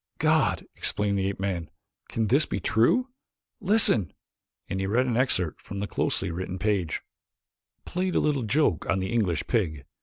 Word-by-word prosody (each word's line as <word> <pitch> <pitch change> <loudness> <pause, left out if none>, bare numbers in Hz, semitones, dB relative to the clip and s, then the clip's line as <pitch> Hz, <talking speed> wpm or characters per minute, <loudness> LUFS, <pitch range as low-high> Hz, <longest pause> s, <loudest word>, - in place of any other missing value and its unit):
"God!" - - +2
exclaimed 100 -1 0
the 95 - 0
ape 100 - -4
man. 95 -4 -3 0.4
"Can 115 - -1
this 135 +8 +4
be - - -2
true? 240 - +2 0.5
Listen!" 195 - +4 0.6
and 95 - -3
he 95 - -1
read 120 +6 +2
an 120 -3 -1
excerpt 95 - +1
from 100 - -7
the 100 - -2
closely 90 - -1
written 90 +2 -4
page: 95 -5 -1 0.8
"'Played 185 0 -2
a - - +4
little 145 -3 +1
joke 115 - +1
on 95 - +2
the 95 +4 -2
English 90 -9 0
pig. 80 - -1
100 Hz, 170 wpm, -26 LUFS, 95-125 Hz, 0.8 s, this